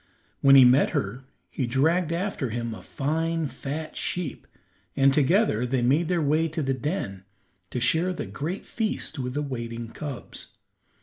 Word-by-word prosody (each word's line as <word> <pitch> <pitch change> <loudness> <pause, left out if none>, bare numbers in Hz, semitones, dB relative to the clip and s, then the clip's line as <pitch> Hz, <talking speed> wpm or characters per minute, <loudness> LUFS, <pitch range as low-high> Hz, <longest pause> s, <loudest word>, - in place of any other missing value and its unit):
When 135 0 +7
he 130 -2 +9
met 125 +3 +5
her 120 +7 -3 0.3
he 130 - -2
dragged 160 +7 +2
after 170 - -2
him 115 0 -3
a - - -9
fine, 160 +3 -1
fat 145 +4 -5
sheep, 175 -6 -3 0.5
and 135 0 +4
together 150 - +3
they 125 0 0
made 145 +7 +3
their 175 -2 +1
way 155 +3 +2
to 155 0 -3
the 135 0 +1
den 130 - -3 0.5
to 125 - -3
share 165 +9 +2
the 180 - -4
great 170 +7 -5
feast 215 -9 -2
with 125 0 -3
the 150 - 0
waiting 115 -4 -5
cubs. 140 +1 -8
140 Hz, 165 wpm, -26 LUFS, 125-165 Hz, 0.5 s, he